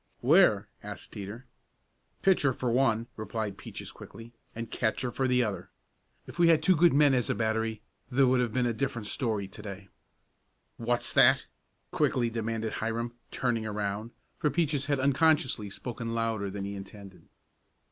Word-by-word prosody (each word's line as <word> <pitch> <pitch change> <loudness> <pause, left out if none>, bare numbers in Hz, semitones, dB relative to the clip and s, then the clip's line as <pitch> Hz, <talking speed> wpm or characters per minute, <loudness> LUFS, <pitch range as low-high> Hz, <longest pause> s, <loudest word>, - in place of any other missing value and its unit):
"Where?" - - +5
asked - - -8
Teeter. 105 +5 -7 0.8
"Pitcher 160 -8 +4
for 120 0 -2
one," 115 -2 +2
replied 110 -1 -3
Peaches - - -8
quickly, 115 +1 -12 0.2
"and 115 0 -6
catcher 120 +2 -1
for 130 +2 0
the 125 -1 +3
other. 95 -4 -4 0.6
If - - -11
we 170 - +6
had 165 -2 +4
two 185 - +5
good 170 +1 +5
men 145 0 +5
as 125 -3 +1
a - - +1
battery 110 -1 -1 0.3
there 135 +2 +4
would 130 0 +3
have 120 -2 0
been 125 +2 +1
a 120 - +1
different 120 -2 -3
story 105 -3 -2
to 95 - -11
day." 100 -2 -8 0.9
"What's 120 +1 0
that?" - - +5 0.5
quickly 120 -2 +1
demanded 115 -1 -2
Hiram, 115 +2 -2 0.2
turning 115 -3 -1
around, 105 +1 -3 0.3
for 150 - +2
Peaches 145 -4 0
had 145 -2 +1
unconsciously 140 -5 +2
spoken 115 +2 -5
louder 115 -3 -1
than 100 0 -5
he 100 - -4
intended. 100 -1 -11
115 Hz, 160 wpm, -29 LUFS, 110-130 Hz, 0.9 s, we